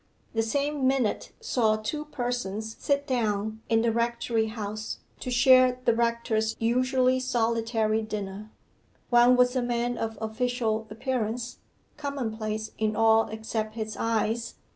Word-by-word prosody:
The 225 - +2
same 280 +4 0
minute 260 -5 0
saw 235 - +2
two 295 +8 -4
persons 240 -6 -3
sit 280 0 0
down 220 -4 -1
in 225 0 +3
the 235 - +2
rectory 235 -1 0
house 215 -1 -5 0.2
to - - -5
share 255 0 +5
the 235 - +5
rector's 230 -1 0
usually 255 +2 +2
solitary 230 -3 +1
dinner. 210 -1 -5 0.6
One 240 +1 +6
was 250 +1 +4
a 255 - +2
man 240 0 -1
of 225 -1 -3
official 225 0 -1
appearance, 235 +1 -3 0.4
commonplace 220 -7 -3
in 215 -1 0
all 225 0 +4
except 220 0 -4
his 220 -1 -4
eyes. 230 +1 -1
230 Hz, 130 wpm, -27 LUFS, 220-250 Hz, 0.6 s, One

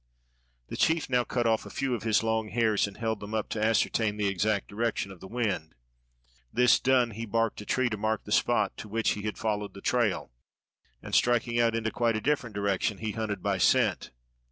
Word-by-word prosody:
The - - -5
chief 160 -4 +1
now 125 -1 +3
cut 120 0 -1
off 110 -1 +2
a - - -10
few 135 -2 -2
of 120 - -2
his 110 -1 +2
long 110 -1 0
hairs 110 -3 +2
and 100 - -11
held 110 -1 -2
them 105 +2 -6
up 110 - -2
to 110 - -2
ascertain 110 -1 +1
the 105 - 0
exact 100 +1 0
direction 105 -2 -2
of 95 - -12
the 95 - -10
wind. 95 -9 -2 0.8
This 125 +2 +4
done, 125 -3 +3
he 115 +2 -6
barked 115 0 0
a 105 - -11
tree 130 -1 +1
to 110 -3 -3
mark 110 +1 -1
the 105 - -10
spot 110 -3 +2
to 105 - -8
which 115 +1 +1
he 105 - -3
had 105 0 -4
followed 105 -2 -2
the - - -8
trail, 120 - 0 0.7
and - - -9
striking 120 -1 +2
out 115 -1 +3
into 110 -1 -1
quite 115 0 +1
a - - 0
different 125 -6 -1
direction 100 0 0
he 110 +1 -3
hunted 110 -2 -4
by 100 -2 0
scent. - - +2
110 Hz, 215 wpm, -28 LUFS, 105-115 Hz, 0.8 s, This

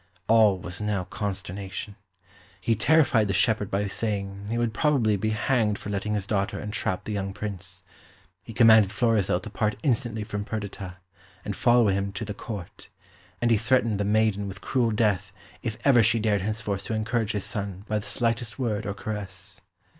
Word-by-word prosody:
All 110 -3 +5
was 90 +2 -4
now 105 -3 0
consternation. 100 +1 -5 0.6
He 115 +5 +1
terrified 130 -2 +4
the 100 - 0
shepherd 105 +1 +2
by 100 +1 0
saying 100 -1 -3
he 115 - -1
would 120 -2 0
probably 120 -5 +2
be 110 +2 -1
hanged 110 -1 +1
for 105 - -6
letting 105 +1 -1
his 100 -2 -2
daughter 100 -1 -1
entrap 105 -3 -2
the - - -5
young 100 -1 -2
Prince; 95 -3 -6 0.6
he - - -10
commanded 110 -3 +6
Florizel 105 -5 +2
to 105 - -7
part 105 0 0
instantly 120 -4 0
from 105 0 -4
Perdita, 100 -4 -5 0.5
and - - -3
follow 120 -3 +4
him 100 +1 0
to 110 - -4
the 105 - -4
Court; 100 -3 -8 0.5
and 120 - +3
he 115 - +5
threatened 115 -2 +2
the - - +1
maiden 105 -1 +2
with 100 0 -7
cruel 125 -3 +1
death 105 -3 +1 0.3
if 110 -3 -3
ever 130 -4 +6
she 115 +1 +3
dared 105 -2 +1
henceforth 105 -1 -2
to 110 - -2
encourage 110 0 0
his 105 -2 -2
son 100 -2 -4
by 105 0 0
the 105 - -9
slightest 115 -1 -1
word 110 -5 -1
or 100 - -3
caress. 100 -2 -5
105 Hz, 180 wpm, -26 LUFS, 100-115 Hz, 0.6 s, commanded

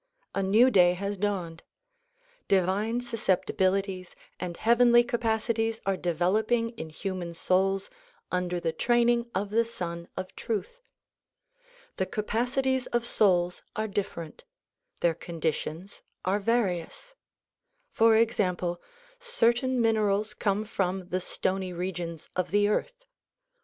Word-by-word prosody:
A 195 - 0
new 220 +7 +5
day 180 -4 +6
has 200 +2 -3
dawned. 180 -5 -2 0.9
Divine 200 +5 +1
susceptibilities 195 -4 0 0.2
and 175 -1 -5
heavenly 240 +1 +5
capacities 225 -1 0
are 195 0 +1
developing 205 +7 +1
in 225 -9 -8
human 175 +1 -5
souls 190 +3 +1 0.4
under 180 -1 -1
the 165 - -1
training 240 +4 +2
of 200 +1 -1
the 230 +2 +3
Sun 170 -7 -5
of 185 0 -5
Truth. 475 - -4 1.2
The - - 0
ca 215 -3 -3
pacities 255 +4 0
of 240 -1 +1
souls 180 -6 +2
are 215 +1 -1
diiferent. 195 - -4 0.6
Their 170 - +3
conditions 165 +2 -4 0.2
are 190 +3 +2
various. 205 - -1 0.8
For 225 - +5
example, 180 -6 +1 0.4
certain 255 - +1
minerals 215 -2 +2
come 205 0 0
from 190 -3 -2
the 185 0 -1
stony 185 0 -2
regions 170 -2 -4
of 185 - -1
the 205 +1 +3
earth. - - -2
200 Hz, 115 wpm, -28 LUFS, 180-230 Hz, 1.2 s, day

